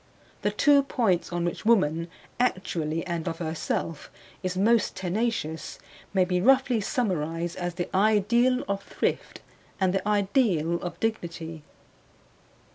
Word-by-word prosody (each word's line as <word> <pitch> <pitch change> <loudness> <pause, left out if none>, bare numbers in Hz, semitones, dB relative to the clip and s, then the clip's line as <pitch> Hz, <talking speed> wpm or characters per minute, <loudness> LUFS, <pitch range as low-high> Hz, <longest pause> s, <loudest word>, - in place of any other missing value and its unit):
The - - +1
two 290 -1 +5
points 225 -12 0
on 175 0 -1
which 175 - -3
woman, 165 -8 +3 0.3
actually 170 -8 -1
and 170 -1 -3
of 165 -1 -2
herself, 160 -1 -3 0.3
is 185 -1 -3
most 225 +4 +3
tenacious 190 -4 -2 0.3
may 190 -2 +3
be 180 0 0
roughly 260 -1 +4
summarized 170 -7 -1
as 175 -1 -3
the 175 -1 -2
ideal 220 +5 +3
of 200 0 -1
thrift - - -3 0.4
and 190 -2 +2
the 195 +1 -1
ideal 200 - +2
of 175 -1 -6
dignity. 170 -7 -3
185 Hz, 125 wpm, -27 LUFS, 170-220 Hz, 0.4 s, two